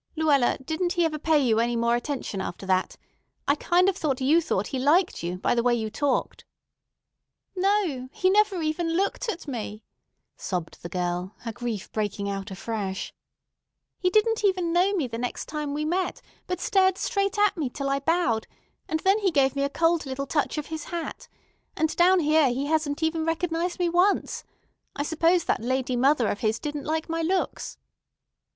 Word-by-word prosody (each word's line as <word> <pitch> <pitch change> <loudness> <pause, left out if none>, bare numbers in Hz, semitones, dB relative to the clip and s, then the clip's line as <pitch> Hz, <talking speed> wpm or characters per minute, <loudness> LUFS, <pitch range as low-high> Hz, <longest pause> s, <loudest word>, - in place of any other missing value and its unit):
"Luella, 295 -6 +3
didn't 345 +4 -1
he 345 -1 +2
ever 310 -1 -2
pay 315 +1 +3
you 240 -6 +3
any 235 +1 +1
more 235 0 +2
attention 240 -6 -3
after 190 +1 -6
that? 185 -1 0 0.5
I 280 - +5
kind 350 +5 +2
of 390 - +2
thought 290 -8 -1
you 295 +6 +4
thought 205 - -1
he 265 - -2
liked 330 +7 +3
you, 175 +1 -3
by - - +1
the 235 - +2
way 240 0 +3
you 220 -2 -3
talked." 280 +3 -1 1.1
"No, 365 -10 0
he 375 0 +2
never 405 -4 +3
even 330 +2 -1
looked 400 +6 0
at 355 -6 -5
me," 215 -5 -5 0.5
sobbed 180 -3 -4
the 170 - -7
girl, 180 +2 -3
her 230 - -4
grief 225 -3 -5
breaking 205 -2 -2
out 195 +1 -4
afresh. 195 0 -4 0.9
"He 365 - +2
didn't 430 +3 +2
even 365 -4 +1
know 360 +3 +4
me 345 -8 0
the 230 -2 -5
next 245 0 -3
time 300 -1 -4
we 300 +1 -2
met, 360 +3 -1 0.3
but 360 - -2
stared 380 -3 +3
straight 400 -2 -1
at 415 -1 +3
me 305 -7 -2
till 275 +2 -4
I 275 - +1
bowed, 280 -7 +1 0.4
and 315 0 -1
then 390 +3 +3
he 400 -3 +2
gave 275 -4 +2
me 280 - 0
a 280 - +1
cold 330 0 +1
little 270 +1 -3
touch 295 +2 -1
of 300 - -2
his 315 -1 -4
hat. 340 -2 -5 0.5
And 315 0 0
down 360 +1 +5
here 305 -2 +4
he 260 +3 -1
hasn't 310 0 0
even 320 0 +1
recognized 335 +1 -1
me 355 -1 +1
once. 355 +4 +1 0.5
I 285 - -1
suppose 330 +3 +2
that - - 0
lady 260 +1 -1
mother 260 -1 +3
of 205 - -2
his 220 0 +1
didn't 295 +1 -5
like 315 +1 -1
my 330 0 -2
looks." 365 +3 -1
305 Hz, 190 wpm, -26 LUFS, 240-350 Hz, 1.1 s, I